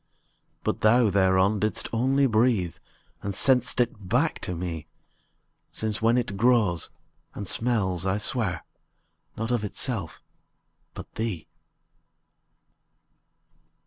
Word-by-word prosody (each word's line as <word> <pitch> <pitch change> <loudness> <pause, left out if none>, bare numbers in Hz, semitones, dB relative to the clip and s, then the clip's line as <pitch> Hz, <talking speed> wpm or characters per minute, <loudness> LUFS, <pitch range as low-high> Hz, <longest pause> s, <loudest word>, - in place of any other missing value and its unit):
But - - -2
thou 110 0 +4
thereon 95 +1 +3
didst 105 +2 0
only 135 +4 +2
breathe, 110 - +2 0.4
And 100 -1 -4
sent'st 125 +3 +2 0.2
back 95 -3 0
to 90 - -4
me: 85 -3 -5 0.8
Since 110 0 -2
when 115 +2 +3
it 105 -5 -2
grows, 110 -7 +2 0.5
and 100 - -5
smells, 100 -8 +1
I 95 +1 0
swear, 105 - -1 0.7
Not 110 +2 -2
of 120 -3 0
itself, 105 - -2 0.8
but - - -10
thee. 110 -8 -4
105 Hz, 105 wpm, -26 LUFS, 95-120 Hz, 0.8 s, thou